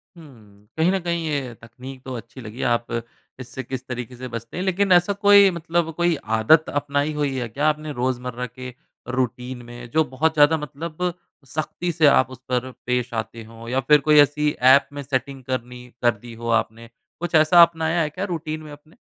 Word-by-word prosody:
हुँ। 110 -10 -17
कहीं 165 +3 +3
न 195 - 0
कहीं 170 -2 -2
ये 140 -5 -2
तकनीक 130 +3 -11
तो 130 - -6
अच्छी 120 +3 -10
लगी 110 +2 -8
आप 120 0 -5 0.5
इससे 130 +1 -7
किस 130 +1 -6
तरीके 125 0 -6
से 130 +1 -7
बचते 115 +2 -7
हैं। 180 - -2
लेकिन 190 +1 +1
ऐसा 180 +3 +5
कोई 200 -1 +8
मतलब 170 0 -1
कोई 175 -1 +2 0.2
आदत 155 +8 +4
अपनाई 145 +1 -1
हुई 145 -2 -1
है 125 -2 -2
क्या 145 +7 0
आपने 155 0 -3
रोज़मर्रा 125 -1 -2
के 125 +1 -9 0.4
रूटीन 125 0 -3
में 120 0 -10
जो 160 +6 +2
बहुत 150 +4 0
ज़्यादा 150 +1 +5
मतलब 155 +4 -4 0.3
सख़्ती 155 +5 -3
से 160 -1 +2
आप 130 -3 +4
उस 130 - -10
पर 125 0 -1 0.2
पेश 125 -1 -1
आते 115 0 -5
हो 115 +1 -12
या 130 +2 +1
फिर 150 - +8
कोई 150 -1 +6
ऐसी 145 +1 +3 0.2
ऐप 140 - +1
में 145 - -5
सेटिंग 135 0 -3
करनी 125 -1 -5
कर 120 - +4
दी 120 - -9
हो 115 - -4
आपने। 115 +1 -13 0.3
कुछ 175 -1 -2
ऐसा 155 +3 +7
अपनाया 165 0 +1
है 150 - 0
क्या 185 +6 -4
रूटीन 160 -4 -4
में 155 - -11
अपने? 150 +5 -16
140 Hz, 200 wpm, -22 LUFS, 125-160 Hz, 0.5 s, कोई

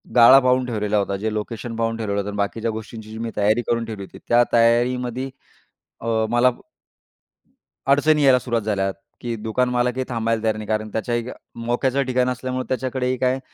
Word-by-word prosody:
गाळा 125 +3 +9
पाहून 130 0 +2
ठेवलेला 105 -3 -1
होता, 100 -1 0
जे 110 +2 -2
लोकेशन 115 +2 -4
पाहून 115 0 -1
ठेवलेलं 100 -3 -2
होतं 100 - -3
आणि 105 - -6
बाकीच्या 110 +3 -1
गोष्टींची 110 0 -8
जी 110 - -7
मी 115 0 -3
तयारी 105 +3 +3
करून 115 -1 +1
ठेवली 110 -3 -6
होती. - - -12
त्या 120 0 +5
तयारीमध्ये 120 +2 +2 0.7
अ, 115 - -7 0.2
मला 120 +2 +4 1.4
अडचणी 150 +1 +4
यायला 130 -2 +6
सुरुवात 120 -3 -2
झाल्या, 100 -2 0 0.3
की 120 -1 -3
दुकानमालाकही 125 +3 0
थांबायला 115 -1 -1
तयार 110 -1 +1
नाही. 110 -1 -7
कारण 110 0 -1
त्याच्याही 120 +1 -2 0.4
मोक्याचं 130 +3 +1
ठिकाण 125 0 +1
असल्यामुळे 130 0 -3
त्याच्याकडेही 130 0 -1
काय 130 +1 +1
115 Hz, 170 wpm, -22 LUFS, 110-125 Hz, 1.4 s, गाळा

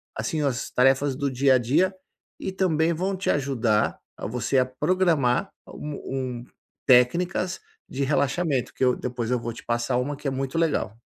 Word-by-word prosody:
Assim, 160 -5 -2
as 135 -5 -1
tarefas 135 +1 +3
do 140 0 -1
dia 130 +1 +3
a - - +6
dia, 160 +11 +2 0.5
e 190 - -3
também 170 -4 +1
vão 190 +4 -1
te 185 - -3
ajudar 125 -7 +1 0.2
a - - -5
você 125 +4 -1
a 130 - +4
programar 160 +1 +1 0.2
um 150 -1 -6 0.4
um 120 - -11 0.4
técnicas 175 +9 +3 0.3
de 140 +1 -3
relaxamento, 140 0 0
que - - -3
eu 125 -1 +4
depois 120 -2 -4
eu 125 - +2
vou 115 0 -5
te - - -11
passar 120 +1 0
uma 140 +3 -1
que 145 - -5
é - - 0
muito 135 +4 -3
legal. 145 -10 0
135 Hz, 180 wpm, -25 LUFS, 125-165 Hz, 0.5 s, a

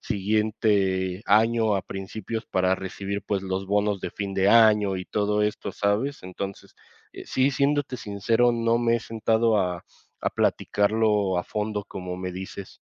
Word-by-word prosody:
siguiente 100 -3 0
año 110 0 +3
a 95 - -1
principios 105 +3 -6
para 95 0 +1
recibir 100 +1 -5
pues 100 -2 -1
los 95 0 -3
bonos 105 0 +1
de - - -4
fin 100 -1 -5
de 95 +1 +3
año 105 -4 +5
y 90 - -5
todo 105 +1 0
esto, 105 0 -2
¿sabes? 105 +8 -1
Entonces, 95 +1 -7 0.4
eh, - - -9
sí, 130 +2 +2
siéndote 140 -1 0
sincero, 110 +4 +1
no 115 0 +1
me 120 -1 +2
he - - -4
sentado 115 0 +1
a, 90 -2 -2 0.4
a - - +1
platicarlo 105 -2 +1
a 90 - -1
fondo, 105 -1 -3
como 90 -2 -6
me 90 0 -5
dices. 95 +1 -8
105 Hz, 160 wpm, -25 LUFS, 95-110 Hz, 0.4 s, año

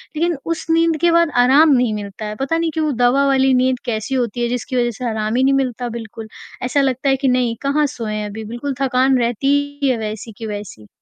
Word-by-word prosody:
लेकिन 335 -1 0
उस 330 -1 -3
नींद 330 -1 +3
के 345 -1 +4
बाद 335 -2 +3
आराम 290 +5 +5
नहीं 245 -4 +2
मिलता 205 +1 -6
है। 210 0 -5
पता 275 +5 0
नहीं 330 -1 -1
क्यों 315 -1 0
वो 300 - 0
दवा 275 +3 +4
वाली 265 -1 +3
नींद 255 0 +2
कैसी 225 +3 -2
होती 240 -1 -1
है, 240 - +1
जिसकी 250 +1 -3
वजह 240 -1 +1
से 250 - -4
आराम 215 +1 -2
ही 260 - +2
नहीं 275 +1 +3
मिलता 250 -3 -1
बिल्कुल। 225 -1 -8 0.4
ऐसा 265 +3 +1
लगता 265 +1 0
है 270 - +4
कि 270 - +1
नहीं 250 -2 +1
कहाँ 290 +2 +1
सोए 220 -3 -4
हैं 210 -1 -3
अभी 220 +2 -7
बिल्कुल 240 +5 -4
थकान 260 0 +2
रहती 285 +5 0
है 255 -3 +1
वैसी 220 +1 -5
की 225 - -7
वैसी। 205 - -7
255 Hz, 235 wpm, -19 LUFS, 225-280 Hz, 0.4 s, आराम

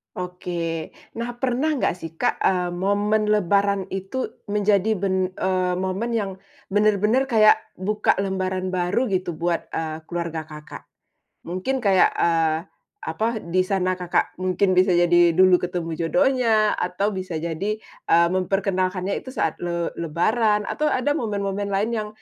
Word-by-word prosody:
Oke. 175 -3 -4 0.2
Nah, 240 +1 -3
pernah 265 +5 +1
nggak, 260 - 0
sih, 165 -2 -7
Kak, - - 0
eee, 180 -2 +1
momen 205 +4 +1
lebaran 200 -1 +2
itu 195 +7 -4 0.2
menjadi 205 0 +2
ben 190 -1 -1
eee, 185 -1 0
momen 190 +6 -2
yang 205 -4 -1 0.4
benar-benar 210 +5 +2
kayak 220 -4 +5 0.2
buka 210 +3 +1
lembaran 185 -1 -2
baru, 185 +7 0
gitu, 185 -2 -1
buat, 170 +1 -1
eee, 160 0 -4
keluarga 170 -2 -4
Kakak? 150 -1 -11 0.6
Mungkin 215 +10 -3
kayak, 195 -3 +4
eee, 165 -2 +2 0.5
apa, 220 - -1 0.2
di 170 +2 -1
sana 185 -2 0
Kakak 180 0 -1
mungkin 185 +1 +1
bisa 185 0 +4
jadi 175 -1 +4
dulu 185 0 +6
ketemu 175 -2 -4
jodohnya, 240 -3 +2
atau 190 +4 -1
bisa 185 -3 -5
jadi, 170 +6 -2
eee, 170 +1 +1
memperkenalkannya 185 0 0
itu 260 0 -11
saat 165 - -1
le 170 -1 -2
lebaran, 210 +7 +1
atau 300 +8 -1
ada 290 0 +1
momen-momen 205 -7 -2
lain 200 +3 0
yang 215 -2 -2
190 Hz, 140 wpm, -23 LUFS, 175-210 Hz, 0.6 s, dulu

